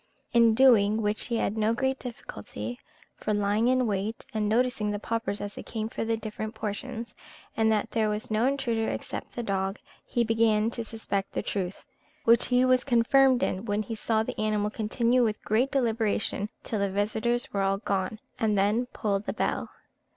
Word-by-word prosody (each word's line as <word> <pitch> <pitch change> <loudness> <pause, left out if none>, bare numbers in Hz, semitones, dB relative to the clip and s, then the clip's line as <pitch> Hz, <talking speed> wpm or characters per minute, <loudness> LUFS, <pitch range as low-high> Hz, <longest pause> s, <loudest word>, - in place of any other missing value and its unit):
In 230 -2 +5
doing 220 -4 +5
which 210 +1 0
he 235 - 0
had 215 - 0
no 220 +1 +1
great 265 +1 0
difficulty; 115 - -7 0.4
for, 215 - -1
lying 205 +3 +2
in 255 0 +3
wait, 210 +1 -2
and 210 -1 0
noticing 230 -2 +1
the 205 - -1
paupers 225 -1 -2
as 205 0 -5
they - - -7
came 220 -1 -4
for - - -3
their 225 0 0
different 220 0 -5
portions, 225 +2 -5 0.4
and 220 0 +3
that 215 -2 0
there 220 -2 +1
was 210 +1 -3
no 220 +3 +3
intruder 235 -5 0
except - - -5
the 240 - -3
dog, 195 -1 -1 0.3
he 240 - 0
began 225 -1 +2
to 235 - -4
suspect 215 -3 -3
the - - -2
truth; 190 -2 -3 0.4
which 230 +1 +5
he 250 0 +4
was 255 0 +4
confirmed 255 +1 +4
in 190 +4 -1
when 210 0 0
he 220 - -5
saw 220 0 0
the - - -6
animal 210 -1 0
continue 235 +3 +1
with 215 -2 0
great 235 +6 +2
deliberation 220 -5 0
till 215 - -2
the 200 0 +1
visitors 220 +6 -1
were 200 - +1
all 195 0 +2
gone, 195 0 -2 0.2
and 215 -2 +2
then 210 +5 +2
pull 205 -5 -1
the 205 - -4
bell. - - -1
220 Hz, 190 wpm, -28 LUFS, 205-235 Hz, 0.4 s, In